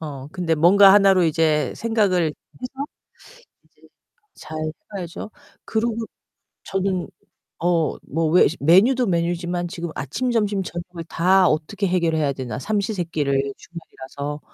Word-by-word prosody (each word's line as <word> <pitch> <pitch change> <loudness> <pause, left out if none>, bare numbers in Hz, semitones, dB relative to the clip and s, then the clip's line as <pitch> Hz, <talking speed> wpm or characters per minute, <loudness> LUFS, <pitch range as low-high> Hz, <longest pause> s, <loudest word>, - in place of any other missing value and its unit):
어, 140 -3 -7
근데 170 -1 -1
뭔가 190 +5 +7
하나로 195 -3 +5
이제 155 -1 +1
생각을 205 -7 +1
해서 255 - -8 0.8
이제 - - -33 0.5
잘 155 - -9 0.4
해봐야죠. 180 +2 -6 0.3
그러고 225 0 -1 0.7
저는 190 -2 -2 0.6
어 170 -2 +1
뭐 165 +3 0
왜 180 - +6
메뉴도 220 - +4
메뉴지만 175 0 -1
지금 170 0 -6
'아침, 160 - -3
점심, 210 -4 0
저녁을 175 -1 -7
다 185 +3 +3
어떻게 175 +7 -1
해결해야 165 -5 +1
되나, 130 -4 -5
삼시 210 - -1
세 180 -3 -2
끼를 140 -4 -1
주말이라서.' 145 -3 -8
175 Hz, 270 characters per minute, -22 LUFS, 155-195 Hz, 0.8 s, 뭔가